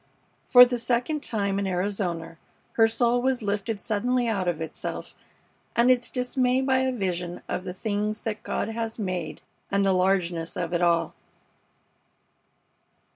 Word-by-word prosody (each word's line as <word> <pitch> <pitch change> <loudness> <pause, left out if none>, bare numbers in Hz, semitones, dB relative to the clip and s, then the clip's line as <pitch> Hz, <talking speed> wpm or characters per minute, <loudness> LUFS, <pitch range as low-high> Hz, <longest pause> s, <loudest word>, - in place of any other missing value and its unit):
For 250 -1 +10
the 245 -1 -2
second 245 +6 0
time 200 -6 -1
in 200 - -1
Arizona 180 -3 -2 0.3
her 225 -1 +5
soul 235 +2 +1
was 260 -2 0
lifted 205 +1 -2
suddenly 240 +4 0
out 200 -5 -1
of 175 -3 0
itself 160 -1 -5 0.6
and 240 +2 +5
its 245 -1 +1
dismay 250 0 +1
by 265 -1 +2
a 260 0 +1
vision 180 -6 -3
of 185 - -3
the 180 - -4
things 210 +1 -2
that 215 -1 -4
God 225 - -2
has 225 0 -4
made 180 -7 -4 0.3
and 200 0 +1
the 195 - +3
largeness 180 -3 0
of 175 0 -3
it 175 - +1
all. 170 -1 +2
210 Hz, 150 wpm, -26 LUFS, 180-245 Hz, 0.6 s, For